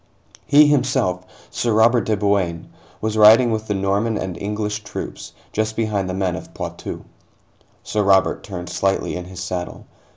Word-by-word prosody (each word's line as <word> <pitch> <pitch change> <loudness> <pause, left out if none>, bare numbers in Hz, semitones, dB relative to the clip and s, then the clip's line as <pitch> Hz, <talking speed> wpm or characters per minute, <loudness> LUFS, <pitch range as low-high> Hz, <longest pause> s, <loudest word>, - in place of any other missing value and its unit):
He 150 +1 +7
himself, 130 -10 +1 0.3
Sir 120 -2 -1
Robert 115 +2 +4
de 110 -1 +1
Bouain, 95 -5 0 0.3
was 110 0 -2
riding 110 +3 +7
with 110 0 -2
the 105 - -1
Norman 100 +3 0
and 95 -2 -4
English 105 +1 -3
troops, 105 - -7 0.2
just 110 +1 -1
behind 105 -4 -1
the 90 - -3
men 95 -2 -1
of - - -10
Poitou. - - -6 0.8
Sir 105 - -1
Robert 95 -1 +3
turned 90 -3 -7
slightly 95 0 -1
in 90 0 -5
his 90 0 -8
saddle. 90 -1 -5
105 Hz, 160 wpm, -21 LUFS, 95-110 Hz, 0.8 s, He